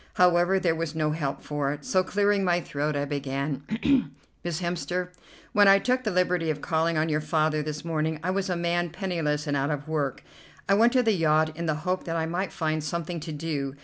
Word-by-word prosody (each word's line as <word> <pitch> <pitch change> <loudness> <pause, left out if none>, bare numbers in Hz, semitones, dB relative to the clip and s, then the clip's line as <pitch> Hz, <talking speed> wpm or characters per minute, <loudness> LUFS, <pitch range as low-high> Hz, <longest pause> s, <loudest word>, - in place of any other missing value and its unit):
However, 180 +1 +4
there 175 -3 +2
was 165 -1 -3
no 155 -1 +1
help 150 -3 -3
for 145 -2 -1
it, 145 -1 -10
so, 185 -1 +2
clearing 205 +1 +1
my 175 -1 +2
throat, 150 -2 -2
I 145 0 0
began: 140 0 -3 0.8
"Miss 170 -2 -2
Hemster, 180 0 -2 0.4
when 205 -1 +6
I 195 0 +8
took 255 +5 0
the 220 - 0
liberty 180 -3 +1
of 150 -1 -1
calling 160 +1 0
on 155 +1 +2
your 155 -1 0
father 155 -1 +1
this 150 +1 -5
morning, 160 -1 -1
I 185 - 0
was 195 0 -1
a 180 - 0
man 175 0 0
penniless 165 -4 -2
and 145 -2 -1
out 140 +1 0
of 145 0 -3
work. 145 -4 -2 0.4
I 195 - +4
went 230 +4 +5
to 255 -1 +4
the 225 - +3
yacht 155 -2 +2
in 170 +1 -4
the 155 0 -2
hope 185 0 -1
that 165 -2 -3
I 160 -1 0
might 180 +4 -2
find 155 -2 -1
something 170 +2 -3
to 160 +1 -6
do. 145 -3 -3
165 Hz, 220 wpm, -27 LUFS, 150-180 Hz, 0.8 s, I